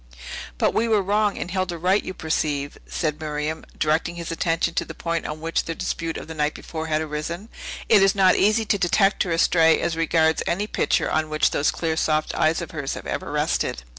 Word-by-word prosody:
"But -, -, +2 dB
we 230 Hz, -, +1 dB
were 215 Hz, -3 st, +3 dB
wrong, 205 Hz, +1 st, +1 dB
and 180 Hz, -, -4 dB
Hilda 185 Hz, -2 st, -1 dB
right, 185 Hz, +5 st, +2 dB
as -, -, -14 dB
you 185 Hz, -, -5 dB
perceive," 145 Hz, -2 st, -1 dB
said 155 Hz, -3 st, -2 dB
Miriam, 150 Hz, +1 st, -3 dB
directing 160 Hz, +3 st, +1 dB
his 170 Hz, -1 st, -5 dB
attention 165 Hz, 0 st, 0 dB
to -, -, 0 dB
the -, -, -9 dB
point 170 Hz, -1 st, -2 dB
on 155 Hz, +1 st, -6 dB
which 165 Hz, +1 st, -1 dB
their 165 Hz, -, -4 dB
dispute 165 Hz, 0 st, -3 dB
of -, -, -8 dB
the 160 Hz, -, -6 dB
night 150 Hz, -1 st, -1 dB
before 160 Hz, -1 st, -6 dB
had 155 Hz, 0 st, +1 dB
arisen. 160 Hz, +7 st, -5 dB, 0.4 s
"It 215 Hz, -3 st, +6 dB
is 195 Hz, 0 st, +4 dB
not 190 Hz, -2 st, +5 dB
easy 215 Hz, +2 st, +3 dB
to 205 Hz, -1 st, +1 dB
detect 195 Hz, +3 st, +3 dB
her 180 Hz, -, 0 dB
astray 165 Hz, 0 st, +4 dB
as 165 Hz, -, -1 dB
regards 160 Hz, -1 st, +2 dB
any 200 Hz, +4 st, 0 dB
picture -, -, 0 dB
on 155 Hz, 0 st, 0 dB
which 155 Hz, 0 st, +2 dB
those 145 Hz, -, +2 dB
clear, 160 Hz, -1 st, -1 dB
soft 155 Hz, -1 st, 0 dB
eyes 160 Hz, +2 st, +1 dB
of -, -, -8 dB
hers 145 Hz, -4 st, -3 dB
have -, -, -8 dB
ever -, -, -4 dB
rested." -, -, -1 dB
165 Hz, 220 wpm, -23 LUFS, 155-185 Hz, 0.4 s, It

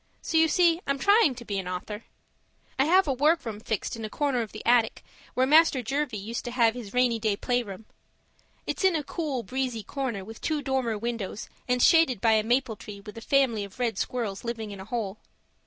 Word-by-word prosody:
So -, -, -3 dB
you 320 Hz, 0 st, +6 dB
see 340 Hz, +1 st, +3 dB
I'm 275 Hz, 0 st, +1 dB
trying 400 Hz, -, +4 dB
to 240 Hz, -1 st, -10 dB
be 200 Hz, -2 st, -2 dB
an 185 Hz, -, -5 dB
author. 205 Hz, +4 st, -5 dB, 0.7 s
I 270 Hz, -, +5 dB
have 365 Hz, +2 st, +4 dB
a 275 Hz, -, +2 dB
workroom 265 Hz, -6 st, +1 dB
fixed 220 Hz, 0 st, -3 dB
in 225 Hz, -, -7 dB
a 215 Hz, -, -4 dB
corner 275 Hz, -1 st, 0 dB
of 220 Hz, -, -5 dB
the 215 Hz, -, -9 dB
attic 235 Hz, -2 st, +3 dB, 0.3 s
where 255 Hz, -, +3 dB
Master 295 Hz, -2 st, +5 dB
Jervie 270 Hz, -1 st, -2 dB
used 220 Hz, +4 st, -5 dB
to -, -, -3 dB
have 235 Hz, -2 st, +3 dB
his 230 Hz, -5 st, -8 dB
rainy 245 Hz, -1 st, +2 dB
day 215 Hz, -2 st, +1 dB
playroom. 225 Hz, -5 st, -2 dB, 0.8 s
It's -, -, -3 dB
in 380 Hz, -3 st, +4 dB
a 305 Hz, -, -1 dB
cool, 285 Hz, -5 st, -3 dB
breezy 255 Hz, -3 st, -3 dB
corner 240 Hz, -9 st, -4 dB
with 225 Hz, +2 st, -11 dB
two 305 Hz, -2 st, -1 dB
dormer 260 Hz, -5 st, 0 dB
windows, 230 Hz, -2 st, -4 dB, 0.2 s
and 250 Hz, 0 st, +2 dB
shaded 325 Hz, -, +5 dB
by 225 Hz, +3 st, +3 dB
a 215 Hz, -1 st, +4 dB
maple 240 Hz, -1 st, 0 dB
tree 200 Hz, -1 st, -9 dB
with 210 Hz, +1 st, -11 dB
a 230 Hz, -, -8 dB
family 245 Hz, -5 st, +2 dB
of 200 Hz, -1 st, -10 dB
red 235 Hz, -5 st, -1 dB
squirrels 220 Hz, -6 st, -3 dB
living 225 Hz, -3 st, -4 dB
in 200 Hz, -, -8 dB
a 190 Hz, -, -8 dB
hole. 215 Hz, -2 st, -4 dB
240 Hz, 215 wpm, -27 LUFS, 215-275 Hz, 0.8 s, you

